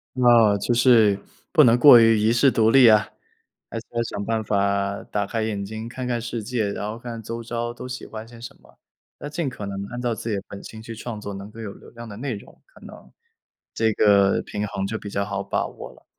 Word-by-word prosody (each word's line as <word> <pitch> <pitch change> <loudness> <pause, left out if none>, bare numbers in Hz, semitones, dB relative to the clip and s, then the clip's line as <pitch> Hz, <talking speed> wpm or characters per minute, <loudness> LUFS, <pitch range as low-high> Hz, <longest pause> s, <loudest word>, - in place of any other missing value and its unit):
那 120 -5 +5
就 120 +4 0
是， 115 -5 +5 0.3
不 160 - +6
能 120 -1 +5
过 120 -2 +9
于 115 -1 +5
遗 110 +2 +2
世 125 +3 +4
独 110 -3 +2
立 125 0 +7
啊！ 110 -1 +4 0.6
还 - - -4
是 115 - -10
还 120 - -4
是 - - -3
想 100 - -4
办 110 +1 -1
法， 100 -1 -1
打 105 - -2
开 115 +2 -3
眼 105 -2 -3
睛 110 +3 -7
看 130 +1 -6
看 120 -1 -1
世 115 0 -5
界， 110 -3 -2
然 105 +1 -4
后 110 - -7
看 120 0 -7
看 115 -1 -7
周 115 +2 -6
遭 120 0 -3
都 125 +1 -9
喜 125 0 -6
欢 110 0 -8
些 115 0 -14
什 120 - -10
么。 - - -23 0.4
要 145 - -6
尽 150 0 -3
可 110 -5 -7
能 100 0 -5
按 120 - -5
照 120 -1 -1
自 110 - -7
己 105 - 0
的 100 - -4
本 100 - -10
性 110 0 -10
去 115 0 -8
创 110 -1 -6
作 100 -1 -6
能 100 +1 -8
够 115 - -12
有 105 -3 -6
流 - - -16
量 120 0 -10
的 105 - -9
内 130 +4 -4
容， 100 - -13
可 - - -21
能， - - -14 0.6
这 110 -1 +1
个 100 -2 +4
平 105 0 -4
衡 95 -1 -3
就 110 +3 -3
比 105 - -8
较 100 0 -1
好 100 -1 -4
把 100 - -2
握 - - -10
了。 - - -23
110 Hz, 275 characters per minute, -23 LUFS, 100-120 Hz, 0.6 s, 过